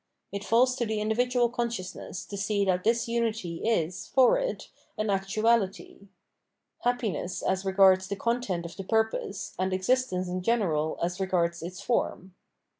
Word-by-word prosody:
It 200 0 -4
falls 250 +4 +3
to 240 - 0
the 215 0 -1
individual 240 +3 +2
consciousness 235 -7 -4
to 205 - -7
see 200 0 0
that 180 -1 +1
this 230 +1 +2
unity 225 -7 -1
is, 180 -6 0
for 265 - +4
it, - - -3 0.3
an 215 -1 0
actu 195 +2 -1
ahty: 210 -3 +1 0.4
— - - -39
^happiness 215 -8 -1
as 190 0 0
regards 190 -1 +5
the 200 - -3
content 200 -5 -1
of 170 - -8
the 195 - -6
purpose, 220 -1 -1
and 185 0 0
existence 185 -2 +1
in 180 +1 -3
general 175 -8 +1
as 180 +2 -2
regards 170 -3 0
its 180 +3 -7
form. 190 -4 -1
200 Hz, 160 wpm, -28 LUFS, 185-235 Hz, 0.4 s, regards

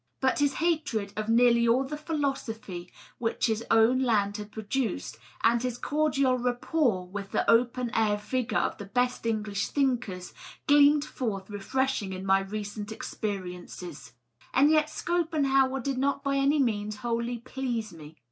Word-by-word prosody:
But 260 +1 +1
his 285 -1 +2
hatred 295 -12 -1
of 215 +1 -3
nearly 235 0 +5
all 245 +3 +4
the 280 +3 -5
philosophy 260 - -3 0.3
which 230 -1 0
his 225 -1 0
own 225 +3 +5
land 205 -5 +2
has 210 -1 -6
produced, 220 +1 -3 0.2
and 230 +1 +4
his 250 -1 -2
cordial 275 -3 +1
rapport 245 - 0
with 195 +1 -6
the - - -1
open 240 +1 +3
air 215 -2 +2
vigor 250 +4 -2
of - - -1
the 205 - -6
best 245 +3 0
English 210 -2 -1
thinkers, 245 -10 -1 0.3
gleamed 290 0 +5
forth 210 -9 -4
refreshing 210 0 -1
in 185 +1 -6
my 195 0 +4
recent 205 +2 -5
experiences. 180 - -6 0.4
And 285 +4 +6
yet 310 -1 +3
Schopenhauer 280 -7 +1
did 265 +1 -2
not 275 +1 0
by 275 -1 0
any 275 +2 +3
means 215 -5 0
wholly 235 +1 -1
please 235 -4 -4
me. 155 -1 -12
235 Hz, 150 wpm, -28 LUFS, 205-270 Hz, 0.4 s, And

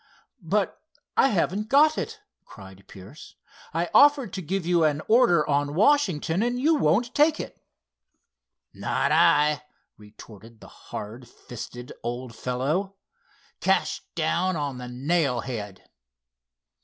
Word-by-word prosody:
"But 195 +4 -1 0.3
I - - +5
haven't 205 -1 -1
got 305 +3 +5
it," 440 -1 -5 0.2
cried 95 -1 -14
Pierce. 100 - -13 0.4
"I 165 +2 -1
offered 285 -5 +5
to 190 - -4
give 185 +1 -3
you 170 -1 +2
an 155 0 +1
order 215 -10 +4
on 145 0 0
Washington, 190 - +2
and 245 +2 -1
you 310 +5 +3
won't 235 - +1
take 305 +1 +3
it." - - -8 1.1
"Not - - -1
I," 150 0 +4 0.4
retorted 110 +1 -15
the - - -14 0.2
hard 115 +4 -7
fisted 120 +1 -10
old 120 0 -5
fellow. 150 - -2 0.6
"Cash - - 0
down 185 - 0
on 140 -4 -4
the 125 - -7
nail 135 0 0
head." 105 -6 -7
155 Hz, 125 wpm, -25 LUFS, -, 1.1 s, I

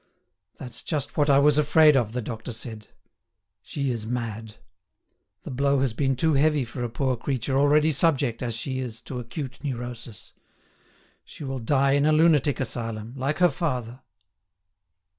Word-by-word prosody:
"That's 125 -3 -8
just 145 -3 -3
what 145 -1 +2
I 140 - +6
was 145 +1 +4
afraid 150 0 +5
of," 115 -5 +1
the 125 -1 -3
doctor 115 +1 -6
said; 110 -2 -8 0.7
"she 140 -2 -3
is 110 -2 -4
mad. 115 -2 -4 0.9
The - - -7
blow 140 +1 +1
has 135 -4 0
been 135 +2 0
too 160 +5 +1
heavy 145 -1 +2
for 120 +1 -6
a 120 - -2
poor 130 +2 -1
creature 130 +1 -2
already 150 +3 +4
subject, 140 -6 +2
as 120 -3 -2
she 130 +3 -3
is, 120 -3 -5
to 125 - -6
acute 130 +4 -7
neurosis. 120 -5 -7 0.9
She - - -11
will 135 -1 -4
die 135 +3 +2
in 145 +1 +3
a - - +4
lunatic 155 -3 +3
asylum 115 -2 -4
like 135 +3 -2
her 180 -2 +4
father." 130 -5 -3
130 Hz, 160 wpm, -25 LUFS, 120-145 Hz, 0.9 s, I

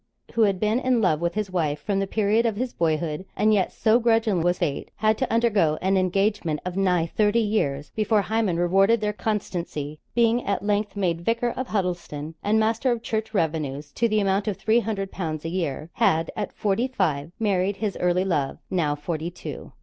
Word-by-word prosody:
who 230 - +1
had 200 -4 +3
been 215 +4 +1
in 255 -2 +2
love 170 -7 +2
with 170 +2 -1
his 210 -3 -2
wife 155 -5 0
from 195 +6 -1
the 195 - -1
period 215 +2 +2
of 225 -3 0
his 245 +3 -3
boyhood; 160 0 -1
and 215 +1 +4
yet 195 -3 +2
so 225 +2 +3
grudging 225 -5 +2
was 175 +1 +1
Fate, 150 -6 -2
had 215 0 +2
to 260 - -2
undergo 210 -10 +2
an 190 +1 +1
engagement 185 -3 +1
of 180 -1 -4
nigh 180 -4 +2
thirty 210 +5 +1
years 155 -11 -1
before 215 -1 +2
Hymen 215 -6 0
rewarded 195 +6 +3
their 210 0 -1
constancy; 170 -9 -3 0.2
being 235 0 +3
at 200 0 -2
length 205 0 0
made 175 -4 0
Vicar 230 +5 0
of 255 +1 -4
Huddelston, 175 -6 -3
and 215 +2 +3
master 225 +3 +1
of 235 -1 -2
church 220 -1 -2
revenues 150 -4 -1
to 235 -1 +1
the 215 0 +2
amount 195 0 +1
of 205 - -1
three 225 +2 +3
hundred 200 -3 -3
pounds 160 -4 -4
a - - -1
year 165 -3 -3
had, 160 +1 +2
at 210 - -3
forty 215 +5 0
five, 165 - -1
married 200 -2 +1
his 210 -2 -2
early 180 +1 +1
love, 145 -7 -1
now 160 -6 +1
forty 155 +2 -4
two. 175 - -8
195 Hz, 200 wpm, -24 LUFS, 170-220 Hz, 0.2 s, and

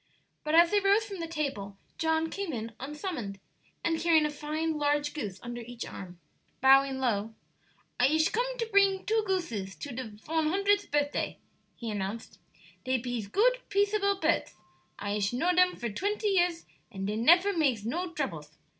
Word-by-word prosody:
But 305 +1 0
as 340 0 +7
they 415 - +4
rose 400 +2 +3
from 395 -3 -7
the 335 - -3
table 275 -12 -4 0.2
John 320 0 +1
came 395 -6 -4
in 225 -1 -4
unsummoned, 270 - -5 0.4
and 325 -1 +1
carrying 320 -2 +4
a 300 - -1
fine 305 +1 -2
large 295 0 +1
goose 205 -11 -5
under 240 0 -6
each 240 0 -7
arm. 180 -2 -9 0.4
Bowing 270 0 +5
low: 225 -4 -1 0.6
"I 245 - +6
ish 315 +3 +3
come - - -1
to 465 - -1
pring 395 -3 +3
two 445 +1 +2
gooses 230 - -2
to 285 - -7
de 255 0 -5 0.2
von 320 0 +1
hundredth 400 +4 +2
birthday," 290 0 -1 0.4
he 230 -2 -5
announced; 205 +2 -5 0.4
"dey 260 0 +1
pees 240 -3 -4
goot, - - +3
peaceable 400 0 +2
pirds: 330 -2 0 0.4
I 205 - -4
ish 205 +2 0
know 335 +9 +2
dem 365 0 +4
for 235 -3 -4
twenty 415 - -1
years, 350 -3 +1 0.3
and 195 -3 -5
dey 210 +1 -1
nefer 350 - +5
makes 270 - +1
no 345 +9 -2
droubles." 160 - -5
305 Hz, 170 wpm, -29 LUFS, 235-365 Hz, 0.6 s, as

